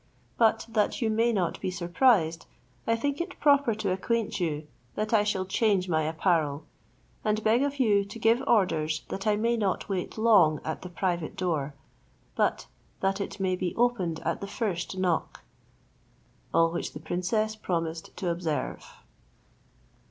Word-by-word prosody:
But 225 Hz, -1 st, +3 dB
that 215 Hz, -2 st, +1 dB
you 220 Hz, -, +1 dB
may 230 Hz, +2 st, +2 dB
not 185 Hz, -6 st, -1 dB
be -, -, -1 dB
surprised, 175 Hz, -1 st, +2 dB, 0.4 s
I 230 Hz, -, +3 dB
think 285 Hz, +6 st, -1 dB
it 365 Hz, +2 st, -6 dB
proper 280 Hz, -6 st, +4 dB
to 215 Hz, -, -2 dB
acquaint 220 Hz, +3 st, -1 dB
you, 155 Hz, -3 st, -2 dB, 0.3 s
that 215 Hz, +2 st, -2 dB
I 210 Hz, -2 st, +5 dB
shall 190 Hz, -3 st, -1 dB
change 195 Hz, -1 st, +1 dB
my 160 Hz, -3 st, +1 dB
apparel, 155 Hz, -1 st, 0 dB, 0.6 s
and 215 Hz, 0 st, 0 dB
beg 225 Hz, +3 st, +3 dB
of 285 Hz, 0 st, -1 dB
you 210 Hz, -5 st, +4 dB
to 205 Hz, +3 st, -9 dB
give 230 Hz, +2 st, +3 dB
orders 160 Hz, -9 st, +2 dB
that 195 Hz, +3 st, -4 dB
I 210 Hz, -, +4 dB
may 230 Hz, +3 st, +1 dB
not 200 Hz, -3 st, -1 dB
wait 190 Hz, +1 st, -3 dB
long 195 Hz, -10 st, +5 dB
at 160 Hz, -, -3 dB
the 180 Hz, -, -7 dB
private 175 Hz, -2 st, -2 dB
door, 150 Hz, -6 st, -2 dB, 0.6 s
but -, -, +1 dB, 0.4 s
that 195 Hz, +1 st, 0 dB
it 200 Hz, 0 st, -5 dB
may 185 Hz, -1 st, +1 dB
be 180 Hz, -1 st, -3 dB
opened 195 Hz, -10 st, 0 dB
at -, -, -2 dB
the 200 Hz, -, -4 dB
first 195 Hz, -4 st, -3 dB
knock;" 180 Hz, -3 st, -1 dB, 1.1 s
all 165 Hz, 0 st, +3 dB
which 170 Hz, -, -4 dB
the -, -, -7 dB
princess 215 Hz, +5 st, -1 dB
promised 165 Hz, -5 st, -3 dB
to 180 Hz, -, -2 dB
observe. 170 Hz, -3 st, -3 dB
195 Hz, 160 wpm, -28 LUFS, 170-225 Hz, 1.1 s, I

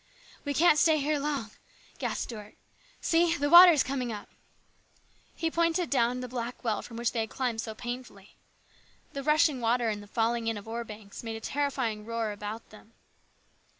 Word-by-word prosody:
" -, -, -24 dB
We 285 Hz, 0 st, -2 dB
can't 310 Hz, -1 st, +5 dB
stay 320 Hz, -2 st, +5 dB
here 295 Hz, +1 st, 0 dB
long," 280 Hz, -7 st, -3 dB, 0.5 s
gasped -, -, -2 dB
Stuart 210 Hz, -3 st, -9 dB, 0.3 s
" -, -, -30 dB
See, 335 Hz, 0 st, +2 dB
the 290 Hz, +1 st, -1 dB
water 350 Hz, +1 st, +11 dB
is 300 Hz, -4 st, +3 dB
coming 255 Hz, -2 st, -3 dB
up! 210 Hz, -2 st, -7 dB, 0.6 s
" -, -, -36 dB, 0.2 s
He 325 Hz, -1 st, -1 dB
pointed 335 Hz, +1 st, +1 dB
down 250 Hz, -1 st, +2 dB
the 250 Hz, -, -5 dB
black 245 Hz, 0 st, -5 dB
well 220 Hz, -3 st, 0 dB
from 230 Hz, -, -10 dB
which 235 Hz, -1 st, 0 dB
they 235 Hz, -, -2 dB
had 220 Hz, -1 st, -2 dB
climbed 240 Hz, -3 st, -2 dB
so 220 Hz, -2 st, -6 dB
painfully. 240 Hz, -4 st, -8 dB, 0.8 s
The 275 Hz, -, -4 dB
rushing 300 Hz, -2 st, +3 dB
water 235 Hz, 0 st, +2 dB
and 210 Hz, -1 st, -3 dB
the 205 Hz, -, -13 dB
falling 230 Hz, +1 st, 0 dB
in 225 Hz, -1 st, 0 dB
of 205 Hz, -, -10 dB
ore 230 Hz, +1 st, -3 dB
banks 210 Hz, -2 st, -10 dB
made 225 Hz, -1 st, -5 dB
a -, -, -5 dB
terrifying 260 Hz, -4 st, -2 dB
uproar 225 Hz, 0 st, -3 dB
about 210 Hz, +2 st, -7 dB
them. 215 Hz, +1 st, -16 dB
240 Hz, 195 wpm, -29 LUFS, 225-290 Hz, 0.8 s, water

